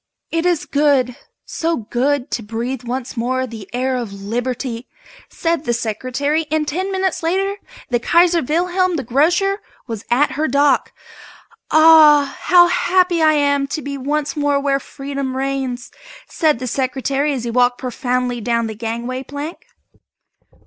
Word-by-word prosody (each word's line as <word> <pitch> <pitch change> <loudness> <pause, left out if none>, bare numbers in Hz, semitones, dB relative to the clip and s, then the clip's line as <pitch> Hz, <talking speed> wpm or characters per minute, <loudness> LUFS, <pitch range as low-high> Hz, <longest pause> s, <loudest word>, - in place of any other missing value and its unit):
"It 330 +1 0
is 345 -4 +1
good, 280 -4 +2 0.3
so 330 0 -1
good 250 +5 -1
to 240 - -2
breathe 230 +4 -4
once 250 +1 -5
more 255 +2 -1
the 220 -5 -10
air 255 +1 -1
of 240 -5 -4
Liberty!" 235 +4 -4 0.4
said 335 -3 -1
the 240 - +1
Secretary, 255 +8 -2
and 310 0 0
ten 375 +6 -2
minutes 380 -2 -1
later 385 +4 0 0.3
the 240 - +2
"Kaiser 340 +6 +3
Wilhelm, 360 +5 0
the 280 - -2
Grocer" 345 - +1 0.2
was 225 -3 -6
at 265 +5 +3
her 300 +4 -1
dock. 280 0 +2 0.8
"Ah! 310 -3 +6
how 350 0 +7
happy 360 -1 +2
I 310 -1 +5
am 285 -1 +1
to 300 +1 -4
be 280 0 -4
once 290 +3 -2
more 290 -1 +1
where 275 -1 +1
Freedom 275 -1 -5
reigns!" 265 -2 -3 0.4
said 310 -5 +1
the 255 - -5
Secretary 270 +3 -1
as 260 -4 -3
he 235 - -3
walked 245 +1 +2
proudly 250 -1 -2
down 235 +1 0
the 220 - -4
gangway 235 +3 -4
plank. 285 +5 -7
275 Hz, 150 wpm, -19 LUFS, 245-315 Hz, 0.8 s, how